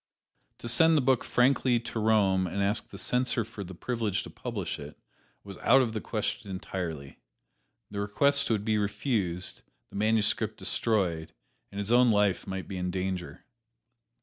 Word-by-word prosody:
To - - -8
send 160 +7 +5
the - - +3
book 130 -2 +3
frankly 125 -1 +3
to 120 -1 -5
Rome 100 -4 +3
and 100 +3 -2
ask 105 +3 +1
the - - -10
Censor 125 -2 +1
for 110 -2 -8
the 95 0 -9
privilege 110 -1 -2
to - - -10
publish - - -5
it, - - -10 0.5
was 100 -2 -10
out 135 +2 +5
of 115 -3 -3
the 110 - -3
question 110 -1 -3
entirely 85 -7 -5 0.7
the 100 - -4
request 140 +8 +2
would 105 -3 0
be 110 -1 +2
refused, 100 -4 -1 0.3
the - - -12
manuscript 110 +1 +1
destroyed, 90 -8 -1 0.4
and 100 - -9
his 100 +2 -1
own 125 0 +6
life 105 -3 +2
might 95 -1 -5
be 95 - -5
in 90 0 -2
danger. 95 -1 -4
105 Hz, 165 wpm, -28 LUFS, 95-120 Hz, 0.7 s, own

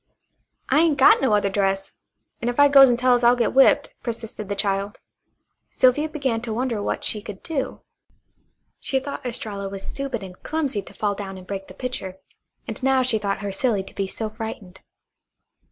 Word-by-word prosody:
"I 275 - +4
ain't 320 -3 +3
got 270 - +6
no 265 - +2
other 200 -1 +1
dress; 195 -1 0 0.5
an' 240 - 0
if 245 - -3
I 285 - +8
goes 275 -1 +8
an' 240 - +2
tells 245 0 +3
I'll 240 +1 +6
get 235 -2 0
whipped," 270 +1 +4
persisted 225 -3 -6
the 200 - -1
child. 200 0 -1 0.7
Sylvia 280 +5 +3
began 270 -7 -1
to 230 -2 -4
wonder 240 -3 -1
what - - -2
she 210 - -1
could 205 -2 -9
do. 280 -5 -3 1.0
She 265 - 0
thought 280 +1 -7
Estralla 215 -5 -4
was 195 0 -7
stupid 270 -6 -4
and 185 -1 -11
clumsy 285 -9 -2
to - - -14
fall 205 -1 0
down 195 -1 -7
and 185 - -11
break 195 0 -6
the 185 - -13
pitcher, 195 -6 -5 0.5
and - - -6
now 265 0 +3
she 235 -3 +2
thought 200 -1 -2
her 200 -1 -3
silly 205 -1 0
to - - -14
be 195 - -2
so 220 +3 -3
frightened. 215 -4 -8
225 Hz, 190 wpm, -23 LUFS, 200-260 Hz, 1.0 s, I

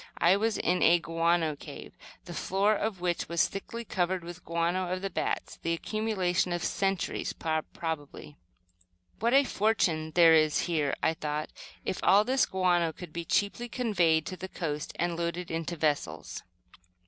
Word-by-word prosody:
I 175 +3 +5
was 220 +2 0
in 180 +1 +1
a 170 +1 +6
guano 165 -1 +1
cave, - - -10 0.3
the - - -7
floor 200 +3 +1
of 210 -3 -2
which 175 -1 -1
was 170 -1 +2
thickly 230 +4 -6
covered 185 -2 -1
with 175 +1 -8
the - - -21
guano 170 +2 -1
of 185 +1 -3
the 195 - -2
bats, - - -3
the 165 - 0
accumulation 185 -2 0
of 175 -1 -2
centuries, 195 -2 -1
probably. 155 -2 -4 0.8
"What 235 +4 +2
a 280 - +7
fortune 195 - +1
there 165 -2 +7
is 155 -1 +4
here," 155 -5 0
I 160 - +3
thought, 150 -1 -4 0.3
"if - - -2
all 200 +2 +6
this 260 +4 +2
guano 175 -3 +2
could 165 -1 -11
be 170 0 -4
cheaply 205 +7 0
conveyed 175 -11 +2
to 185 - -5
the 190 +1 -7
coast 150 -5 -4
and 175 -1 -1
loaded 170 +1 -3
into 165 +1 -3
vessels." 145 - -2
175 Hz, 165 wpm, -29 LUFS, 165-195 Hz, 0.8 s, a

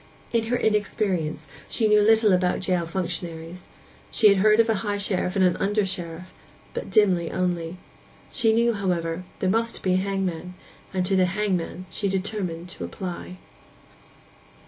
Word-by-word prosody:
In 230 -1 +2
her 245 +2 0
inexperience 195 -8 0 0.2
she 220 - +2
knew 210 0 +5
little 220 -1 +5
about 180 0 +2
jail 180 -3 0
functionaries; 170 -1 -4 0.4
she 215 - +5
had 200 - +4
heard 215 +3 +4
of 230 - +5
a 225 - +3
high 205 -2 -1
sheriff 195 -2 -1
and 190 -1 +4
an 180 - +3
under 205 +1 +1
sheriff; 180 -1 -5 0.4
but - - -5
dimly 185 -6 +3
only. 175 -1 -2 0.5
She 230 -4 +2
knew, 235 +1 +3
however, 175 -5 -1
that 185 0 -13
there 185 - +2
must 230 +2 -1
be 185 - +2
a - - +3
hangman, 185 -2 -2 0.4
and 185 -1 -1
to 195 - +2
the 185 -1 +4
hangman 185 -2 -2
she 200 - -1
determined 185 -3 -2
to 95 - -6
apply. 180 - -6
185 Hz, 165 wpm, -25 LUFS, 175-210 Hz, 0.5 s, knew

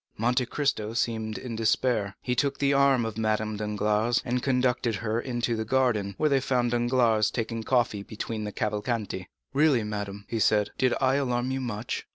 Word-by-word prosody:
Monte 125 +3 +1
Cristo 125 -7 -1
seemed 110 -2 -1
in 120 -3 -6
despair. 110 -2 +1
He 125 - 0
took 140 +3 0
the 140 0 +2
arm 140 -3 +4
of 115 -1 -4
Madame 110 0 0
Danglars, 105 +2 +1
and 125 0 0
conducted 125 -3 +1
her 110 +3 -1
into 120 -2 -1
the 110 - -2
garden, 110 -5 +1
where 155 - +2
they 140 -2 +3
found 125 -2 0
Danglars 120 -3 +2
taking 115 -1 -3
coffee 115 -3 +1
between 110 +1 -5
the 105 - -4
Cavalcanti. 105 -3 -2 0.3
"Really, 140 -5 +3
madame," 105 -1 -5
he 115 - -2
said, 105 -1 +3
"did 130 -1 +3
I 135 +1 +3
alarm 125 -2 0
you 135 0 -2
much?" 115 -2 -4
115 Hz, 180 wpm, -27 LUFS, 110-125 Hz, 0.3 s, arm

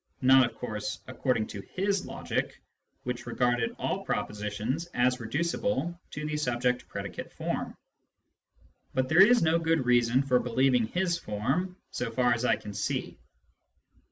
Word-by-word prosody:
(Not, 130 +1 +7
of 115 - -19
course, 105 -3 -4
according 125 -3 0
to 100 - -6
his 195 - -1
logic, - - -3 0.4
which 125 -1 -4
regarded 120 -1 +1
all - - -2
propositions 105 +10 -2
as 125 +1 +2
reducible 170 - -1
to 150 0 -5
the 150 0 -2
subject 125 -3 0
predicate 100 -3 -6
form.) - - -3 1.2
But 130 0 +1
there 160 +4 +7
is 235 +2 +7
no 165 +1 +3
good 160 -4 +1
reason 120 +1 +4
for 125 -2 +3
believing 125 -1 +2
his 175 +4 0
form, 140 - -2
so 125 - -2
far 125 +1 +2
as 120 +1 -1
I 115 - +4
can 105 -1 -9
see. 100 +1 -3
125 Hz, 145 wpm, -29 LUFS, 115-160 Hz, 1.2 s, Not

